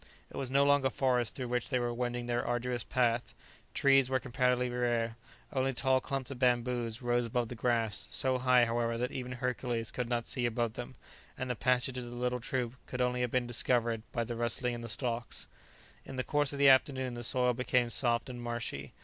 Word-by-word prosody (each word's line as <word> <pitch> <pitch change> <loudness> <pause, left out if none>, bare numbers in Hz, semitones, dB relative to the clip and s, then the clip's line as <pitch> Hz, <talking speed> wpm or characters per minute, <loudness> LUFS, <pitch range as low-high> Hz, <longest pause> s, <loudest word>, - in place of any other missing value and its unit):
It - - -11
was 135 -2 -2
no 140 +2 +4
longer 140 -1 +4
forest 125 -5 +1
through 125 -2 -4
which 125 -1 -1
they 130 - +1
were 120 -1 -1
wending 120 0 -2
their 120 0 -1
arduous 120 -1 -1
path; 120 -2 0 0.4
trees 135 -2 +4
were 130 -1 +2
comparatively 125 +1 +1
rare; 120 -2 0 0.4
only 135 0 +1
tall 130 +1 +2
clumps 135 -1 -3
of 130 - -7
bamboos 120 -1 0
rose 120 0 +1
above 120 0 -1
the - - -5
grass, 115 -3 0
so 130 -1 0
high, 125 -1 +5
however, 115 0 -1
that 125 +2 -2
even 125 -1 -5
Hercules 125 -2 -2
could 125 -1 -3
not 120 -2 0
see 120 -2 0
above 115 -1 -1
them, 125 +2 -7 0.4
and 130 -1 -2
the - - -2
passage 125 +2 +1
of 125 - -6
the 120 0 -8
little 125 0 -1
troop 125 0 -3
could 125 - -5
only 125 0 +1
have 125 - 0
been 125 +1 0
discovered 120 -1 0
by 120 - -1
the 120 +1 -5
rustling 120 +1 +1
in 120 - -5
the 115 - -6
stalks. 120 0 -2 0.6
In 135 - -9
the 130 - -1
course 145 -1 +1
of 140 - -5
the 140 0 +5
afternoon, 130 -1 +3
the 120 0 -6
soil 125 0 +3
became 125 0 +1
soft 120 -3 +2
and 125 -2 -7
marshy. 120 - -5
125 Hz, 210 wpm, -32 LUFS, 120-130 Hz, 0.6 s, high